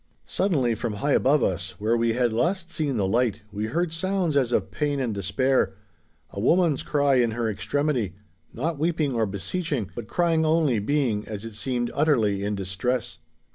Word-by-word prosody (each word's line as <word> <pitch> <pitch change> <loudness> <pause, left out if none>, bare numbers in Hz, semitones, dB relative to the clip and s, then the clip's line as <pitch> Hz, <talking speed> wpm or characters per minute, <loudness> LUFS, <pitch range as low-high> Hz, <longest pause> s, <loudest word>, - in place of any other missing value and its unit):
Suddenly 145 - +1
from 115 0 -3
high 140 +8 -1
above 140 +2 +3
us, 90 0 -2
where 110 +4 +1
we 115 -1 +1
had 120 -1 +1
last 170 - 0
seen 145 -7 -1
the 100 - +1
light, 115 +1 +1
we 105 +1 -3
heard 165 +6 -1
sounds 185 -2 0
as 130 -4 +2
of - - 0
pain 145 -2 -1
and 125 -5 -1
despair—a 100 -5 -2
woman's 165 - +3
cry 145 -2 +2
in 120 -3 +2
her 120 -1 0
extremity—not 115 - -3
weeping 155 -3 0
or 115 -2 +1
beseeching, 110 - -3
but 120 -3 -7
crying 165 +2 +2
only, 155 -7 +2
being, 115 -2 0
as 105 0 -6
it 115 - -7
seemed, 120 +2 -2
utterly 115 -10 +2
in 105 +1 -1
distress. 100 +5 -2
120 Hz, 170 wpm, -25 LUFS, 105-150 Hz, -, above